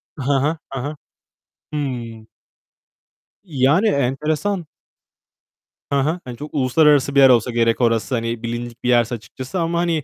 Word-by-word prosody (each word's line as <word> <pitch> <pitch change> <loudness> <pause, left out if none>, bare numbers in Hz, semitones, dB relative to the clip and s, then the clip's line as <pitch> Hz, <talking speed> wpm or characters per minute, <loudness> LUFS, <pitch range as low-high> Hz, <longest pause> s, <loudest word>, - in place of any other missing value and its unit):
Hı 140 - -6
hı. 145 +4 +1 0.2
Hı 135 - -3
hı. 145 +4 -4 0.8
Hıı. 120 -6 -4 1.2
Yani 155 - +2
enteresan. 155 +6 0 1.3
Hı 140 - +3
hı. 160 +6 0
Hani 120 -2 -8
çok 150 +1 -9
uluslararası 140 0 +3
bir - - +6
yer 135 -1 +8
olsa 120 0 +3
gerek 115 +1 +1
orası. 115 +2 +1
Hani 115 0 -3
bilindik 120 0 -5
bir 125 - 0
yerse 120 0 +3
açıkçası 130 - -7
ama 170 0 0
hani 165 -4 0
135 Hz, 145 wpm, -20 LUFS, 120-150 Hz, 1.3 s, yer